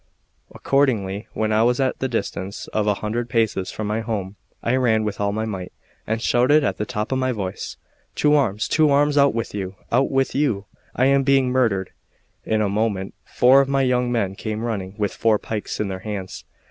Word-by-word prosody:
Accordingly, 110 -8 0
when 110 0 -1
I 110 0 +3
was 120 +2 +2
at 130 -1 0
the 130 - 0
distance 100 -4 -4
of 105 -1 -1
a 105 - +3
hundred 115 +3 -2
paces 110 -5 0
from 110 - -5
my 105 +2 -1
home, 105 -4 -4 0.3
I 120 - +1
ran 110 -4 +2
with 105 -1 -3
all 100 0 +1
my 110 +2 -2
might, 95 -5 -5 0.4
and 110 +1 0
shouted 130 +5 +3
at 95 -8 -1
the 105 - -3
top 110 -2 -3
of 130 - +1
my 130 0 +1
voice: 95 -6 -5 0.4
"To 150 0 +3
arms, 115 -8 +1
to 155 -1 +4
arms! 145 +1 +3
out 140 -4 +4
with 115 - -3
you, 95 -2 -4 0.2
out 130 +3 +3
with 135 0 +1
you! 130 -9 0 0.3
I 130 - +3
am 140 0 +4
being 135 -1 +3
murdered." 115 -7 +1 0.6
In 110 -1 +1
a - - +1
moment 100 -2 -1
four 130 +2 +5
of 135 - -2
my 135 -1 +2
young 125 -1 +1
men 100 -6 0
came 110 +2 -4
running, 100 -5 -3
with 105 -2 -1
four 110 -1 +2
pikes 105 0 -5
in 105 - 0
their 95 -1 -4
hands. 95 -2 -6
110 Hz, 210 wpm, -22 LUFS, 105-130 Hz, 0.6 s, four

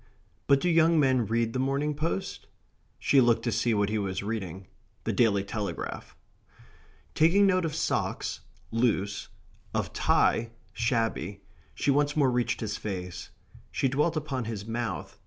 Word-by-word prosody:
But 140 -1 +5
do - - +1
young 165 -1 +4
men 130 -5 +3
read 115 +1 0
the 130 - -1
Morning 140 +3 0
Post? 165 +6 -3 0.5
She 140 - +4
looked 120 -2 +3
to 120 - 0
see 115 +1 +1
what 100 0 +1
he 110 0 0
was 95 -1 -2
reading 95 -4 -4 0.4
the - - -1
Daily 100 -5 +3
Telegraph. 100 0 -5 1.0
Taking 175 +6 +5
note 185 -2 +3
of 155 -2 -3
socks 160 - -1 0.3
(loose), 110 -4 0 0.5
of - - -1
tie 115 0 +2 0.2
(shabby), 115 -5 -1 0.3
she 140 - +1
once 145 +1 +2
more 135 -4 +4
reached 120 -1 0
his 110 -2 -2
face. 90 -4 -5 0.4
She - - 0
dwelt 150 +5 +1
upon 140 -5 -3
his 105 -3 -5
mouth. 115 -4 -4
120 Hz, 150 wpm, -28 LUFS, 105-145 Hz, 1.0 s, But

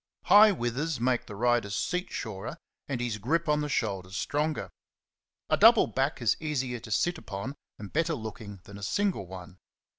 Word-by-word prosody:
High 210 +1 +8
withers 135 0 -2
make 125 0 0
the 105 - -8
rider's 120 -2 +1
seat 180 - -1
surer, 100 -4 -5 0.3
and 135 -3 -2
his 120 -3 -2
grip 160 +10 0
on 150 0 +2
the 150 - -2
shoulders 95 -7 -2
stronger. 150 +5 -1 0.8
A - - +2
double - - +7
back 135 +3 0
'^ - - -15
is 115 - +3
easier 130 -6 -2
to 110 - -11
sit 175 +10 +1
upon, 105 +1 -6 0.2
and 105 -1 -9
better 165 +1 +1
looking 110 -4 -8
than 100 +1 -11
a - - -9
single 195 - 0
one. 90 0 -10
120 Hz, 180 wpm, -29 LUFS, 105-150 Hz, 0.8 s, High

